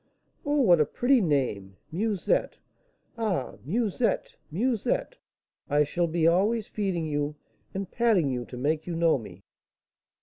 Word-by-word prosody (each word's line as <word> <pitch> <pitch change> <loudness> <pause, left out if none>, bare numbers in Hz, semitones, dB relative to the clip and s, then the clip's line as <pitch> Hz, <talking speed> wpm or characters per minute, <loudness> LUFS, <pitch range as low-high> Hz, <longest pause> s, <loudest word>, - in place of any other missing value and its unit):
"Oh, 290 0 +1
what 175 - +5
a - - +4
pretty 250 - +2
name! 120 - -1
Musette! 200 +2 0 0.6
Ah, 195 - -1
Musette, 225 - 0
Musette, 250 - -1 0.5
I 145 +1 +4
shall 170 +4 0
be 165 0 0
always 200 +6 +3
feeding 190 -7 -2
you 145 -1 -2 0.4
and 195 -1 -4
patting 215 - +2
you 125 -1 -2
to 125 - -9
make 150 +5 -1
you 175 - -3
know 165 -4 +3
me." 95 -4 -12
170 Hz, 135 wpm, -27 LUFS, 145-220 Hz, 0.6 s, what